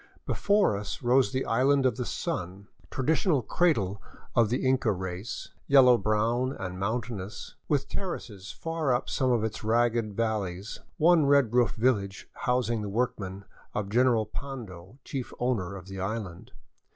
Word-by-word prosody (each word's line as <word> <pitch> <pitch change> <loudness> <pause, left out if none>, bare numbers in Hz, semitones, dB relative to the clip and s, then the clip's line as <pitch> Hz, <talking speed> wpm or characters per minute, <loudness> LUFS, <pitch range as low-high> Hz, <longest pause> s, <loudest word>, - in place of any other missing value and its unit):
Before 205 - +2
us 100 +4 -5
rose 125 -2 +4
the 130 - -1
Island 135 +3 +3
of 130 - +3
the 125 -2 -3
Sun, 95 +3 -4 0.2
traditional 145 - +1
cradle 105 - +1 0.3
of 115 -3 +4
the 125 +3 -1
Inca 130 -3 +3
race, 95 +2 -5 0.2
yellow 130 -3 +7
brown 115 +5 +1
and 90 -1 -5
mountainous, 110 -1 -4
with 140 -2 +1
terraces 110 - -5
far 165 -4 -2
up 125 +1 0
some 130 - +1
of 120 -3 +2
its 110 0 -3
rugged 115 -1 +1
valleys, 105 -3 -2 0.2
one 160 -2 +5
red 140 -5 +4
roofed 125 -1 +3
village 105 -5 0
housing 120 -3 0
the 105 - -4
workmen 100 -4 -2 0.3
of 100 -2 -2
General 120 0 +3
Pando, 110 -5 -8
chief 130 -3 -5
owner 105 -7 -1
of 95 -1 -9
the 95 0 -8
island. 95 -2 -5
115 Hz, 150 wpm, -28 LUFS, 100-130 Hz, 0.3 s, yellow